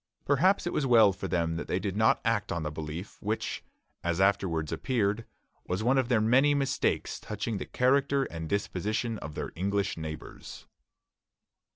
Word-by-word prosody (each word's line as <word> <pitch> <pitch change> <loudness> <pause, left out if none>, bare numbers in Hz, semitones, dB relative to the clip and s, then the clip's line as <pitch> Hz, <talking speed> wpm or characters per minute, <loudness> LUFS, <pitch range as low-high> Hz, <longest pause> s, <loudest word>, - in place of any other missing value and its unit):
Perhaps 175 +9 +3
it 175 - -2
was 135 - 0
well 110 -5 +6
for 95 - -5
them 85 -2 0
that - - -5
they - - 0
did 95 0 -3
not 110 +1 +3
act 110 -2 0
on 85 -1 -2
the 75 - -3
belief, 80 +5 -7
which, 110 +2 -2 0.4
as 85 0 0
afterwards 95 -5 +1
appeared, 115 -3 0 0.4
was 90 +4 -1
one 130 +3 +3
of 130 -1 -1
their 120 -3 +4
many 130 +7 +4
mistakes 140 -2 0
touching 105 0 -4
the - - -5
character 140 +2 +2
and 80 -9 -6
disposition 105 +3 -1
of 75 -1 -8
their - - -4
English 100 +3 -1
neighbors. 80 -1 -8
105 Hz, 170 wpm, -29 LUFS, 85-125 Hz, 0.4 s, well